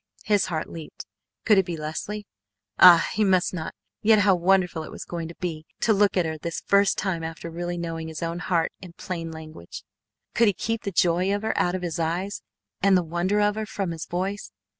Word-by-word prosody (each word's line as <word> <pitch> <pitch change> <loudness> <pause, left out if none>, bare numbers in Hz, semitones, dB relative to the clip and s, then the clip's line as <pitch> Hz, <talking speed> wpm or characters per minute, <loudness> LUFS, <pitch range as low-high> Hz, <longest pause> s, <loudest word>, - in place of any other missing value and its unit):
His 205 -2 +2
heart 160 -4 -3
leaped. 160 -2 -9 0.4
Could 210 -4 +6
it 190 - +2
be 170 -2 -3
Leslie? 180 +7 -5 0.5
Ah! 175 -2 +9
He 215 - +1
must 185 -3 +2
not 165 -3 -5 0.3
yet 220 0 +5
how 200 -1 +5
wonderful 180 -2 +2
it 155 - -8
was - - -8
going 170 -2 -5
to 170 - -10
be 160 -3 -5
to 220 - +4
look 205 -1 +3
at 180 - +3
her 160 -1 -4
this 170 +2 -4
first 200 0 +3
time 185 -4 -2
after 165 +1 -6
really 175 +1 -4
knowing 165 -1 -4
his 160 +1 -6
own 170 +1 -3
heart 170 -2 0
in 180 -2 -10
plain 170 -2 -5
language. 155 - -10 0.5
Could 235 0 +4
he 205 - +3
keep 225 +3 -2
the 200 - -1
joy 180 +2 +2
of 205 - -4
her 220 - -1
out 175 +1 +1
of 185 - -4
his 170 -1 -3
eyes, 175 +5 -2 0.4
and 195 -1 +5
the 180 - +1
wonder 175 +5 0
of 205 0 +3
her 215 0 -4
from 195 -4 -3
his 165 -1 -6
voice? 190 +3 -3
175 Hz, 220 wpm, -25 LUFS, 165-200 Hz, 0.5 s, Ah